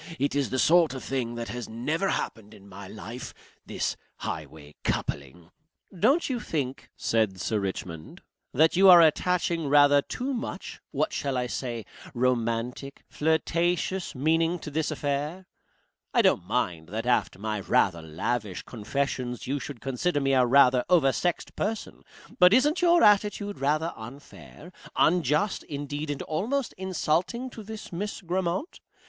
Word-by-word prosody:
It 140 +2 0
is 140 -1 0
the 130 - -2
sort 165 0 +4
of 130 - -6
thing 125 -3 -2
that 120 0 -5
has 125 -1 -5
never 150 +12 -1
happened 110 -1 -4
in 100 -1 -16
my 100 0 -10
life. 110 +5 -8 0.3
This - - -2 0.2
highway 75 0 -7
coupling 80 +5 -3 0.2
" - - -30
"Don't 275 - +3
you 255 -3 -2
think," 140 - -4
said 110 -5 0
Sir 110 +2 -1
Richmond, 90 -5 -6 0.3
"that 160 +5 +3
you 190 +2 +7
are 175 -1 +10
attaching 170 0 +2
rather 145 0 +6
too 255 - -4
much 240 - -6
what - - -1
shall 135 -2 -2
I 125 - 0
say 120 -2 -4 0.3
romantic? 125 +2 -1
flirtatious? 170 +4 0
meaning 165 +5 +2
to 150 - -7
this 155 +1 -1
affair? 150 +4 -3 0.7
I - - +5
don't - - +2
mind 80 -2 -1
that 110 +4 -4
after 125 -6 +1
my 105 +1 -3
rather 90 -3 +2
lavish 95 +6 -3
confessions 125 +1 -3
you 140 +3 -1
should 135 -3 -8
consider 145 +4 -1
me 135 -1 +1
a 130 -2 +4
rather 125 -1 +5
oversexed 175 0 +1
person, 215 +1 -3 0.4
but 180 +3 +7
isn't 295 +7 +3
your 345 -1 +5
attitude 205 0 +3
rather 155 +4 0
unfair, 140 +7 -12 0.2
unjust, 175 +4 +2
indeed, 145 +1 -5
and 145 -1 -3
almost 230 - -2
insulting, 190 +7 -1
to 225 - -9
this 215 +1 -9
Miss 205 +5 -4
Grammont? 180 - -2
145 Hz, 150 wpm, -27 LUFS, 120-180 Hz, 0.7 s, are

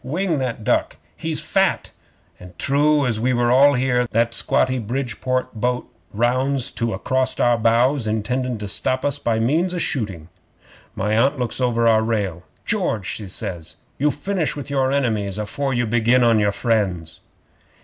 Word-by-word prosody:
Wing 165 +3 -1
that 125 -4 -3
duck. - - 0 0.2
He's - - -2
fat!" - - 0 0.5
An' 90 -1 -13
true 145 +1 +2
as 115 -3 0
we're 120 0 +1
all 140 +3 +6
here, 125 -1 +1
that 115 +1 +1
squatty 130 +2 +1
Bridport 130 +2 -3
boat 125 +2 -2 0.2
rounds 130 +4 0
to 115 -1 -2
acrost 130 0 -1
our 120 0 +4
bows, 115 +3 +2
intendin' 125 +3 -1
to 105 -1 -6
stop 130 +5 -1
us 145 0 -1
by 115 -5 0
means 165 +10 +1
o' - - -2
shooting. 100 - -3 0.7
'My 105 +2 0
Aunt 135 +6 +2
looks 125 +1 -2
over 115 -2 +1
our 110 -1 +4
rail. 100 -7 -2 0.2
"George," 105 -4 -1
she 105 +1 -4
says, 90 -3 -4 0.2
"you 150 +2 +3
finish 165 +3 -2
with 145 -1 -7
your 135 -1 +1
enemies 110 -8 -1
afore 125 +6 -2
you 120 -1 0
begin 120 +2 +3
on 115 -2 +4
your 105 -1 +2
friends." 100 -8 -1
120 Hz, 160 wpm, -21 LUFS, 110-135 Hz, 0.7 s, all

